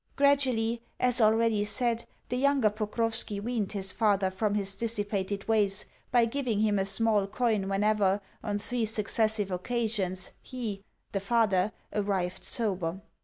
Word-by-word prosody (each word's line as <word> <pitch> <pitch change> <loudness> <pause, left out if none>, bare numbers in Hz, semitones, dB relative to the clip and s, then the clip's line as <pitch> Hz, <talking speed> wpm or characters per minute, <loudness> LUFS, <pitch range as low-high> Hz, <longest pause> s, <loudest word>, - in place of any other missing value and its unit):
Gradually, 255 -5 +2 0.2
as 250 -1 +3
already 220 -1 +4
said, 230 +3 0 0.2
the 250 - -1
younger 270 -4 +3
Pokrovski 215 0 -2
weaned 220 -2 -2
his 195 -2 0
father 200 -4 +2
from 205 +2 0
his 200 -1 -1
dissipated 205 -2 -2
ways 210 -3 +2 0.2
by 240 -2 +4
giving 230 -3 -1
him 210 -2 +2
a 190 - 0
small 205 0 +2
coin 215 -3 0
whenever, 200 0 +2 0.2
on 205 -2 -1
three 225 +2 -2
successive 215 -1 0
occasions, 190 -2 -2
he 225 -6 -5 0.3
(the 195 - -1
father) 200 -2 +2 0.2
arrived 195 -3 -1
sober. 190 -6 -1
215 Hz, 135 wpm, -29 LUFS, 195-230 Hz, 0.3 s, already